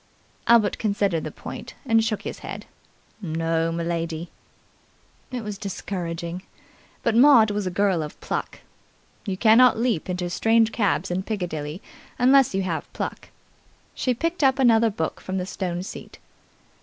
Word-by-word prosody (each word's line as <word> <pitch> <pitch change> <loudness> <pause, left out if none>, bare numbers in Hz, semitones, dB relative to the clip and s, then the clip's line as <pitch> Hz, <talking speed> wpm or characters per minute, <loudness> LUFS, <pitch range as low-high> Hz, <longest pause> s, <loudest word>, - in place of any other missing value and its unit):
Albert 230 -3 +4
considered 200 -6 0
the - - -4
point, - - -9
and 225 -3 +3
shook 220 -2 -2
his - - -6
head. - - -7 0.6
"No, 165 -1 -1
m'lady." 170 0 -3 1.0
It 250 -2 -5
was 210 -2 -6
discouraging. 175 -3 -4 0.6
But 230 - +1
Maud 240 -4 +7
was 205 -2 -2
a - - +1
girl 185 -2 +1
of 150 -1 -7
pluck. - - -4 0.7
You 190 -1 -2
cannot 230 +4 +6
leap 230 -8 0
into 180 -1 -2
strange 225 +3 +3
cabs 195 -4 0
in 180 +1 0
Piccadilly 175 -6 -4 0.3
unless 260 -3 +5
you 195 - 0
have 170 -3 -4
pluck. - - -5 0.6
She 250 -2 -1
picked 330 +4 -2
up 265 0 +4
another 230 -3 +4
book 160 -6 -4
from 190 0 -4
the 180 - -2
stone 180 -2 -3
seat. - - -9
195 Hz, 145 wpm, -24 LUFS, 175-225 Hz, 1.0 s, Maud